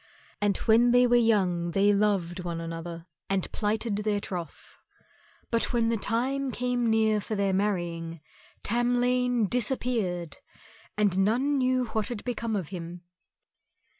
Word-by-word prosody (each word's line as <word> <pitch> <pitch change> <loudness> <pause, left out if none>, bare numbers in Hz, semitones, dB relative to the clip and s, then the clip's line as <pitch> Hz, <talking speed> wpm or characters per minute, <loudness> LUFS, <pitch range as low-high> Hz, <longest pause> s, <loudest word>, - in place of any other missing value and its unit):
And 205 -1 +2
when 230 +2 +4
they 245 0 +6
were 245 0 +3
young 190 -7 +2
they 200 +4 +3
loved 190 -4 0
one 170 -1 -4
another 165 0 -6 0.2
and 195 -2 -1
plighted 215 0 -1
their 210 -1 0
troth. 175 -6 -7 0.7
But 230 +1 0
when 230 -1 +2
the 230 - +1
time 260 +6 -1
came 245 -1 0
near 220 -1 +2
for 215 - -4
their 200 -1 +1
marrying, 175 -4 -2 0.4
Tamlane 245 0 +1
disappeared, 220 - -1 0.6
and 200 -3 +2
none 255 +8 +2
knew 255 -1 +2
what 220 -1 0
had 235 -4 -4
become 230 -2 -2
of 185 -7 -3
him. 175 -1 -7
210 Hz, 135 wpm, -27 LUFS, 185-240 Hz, 0.7 s, they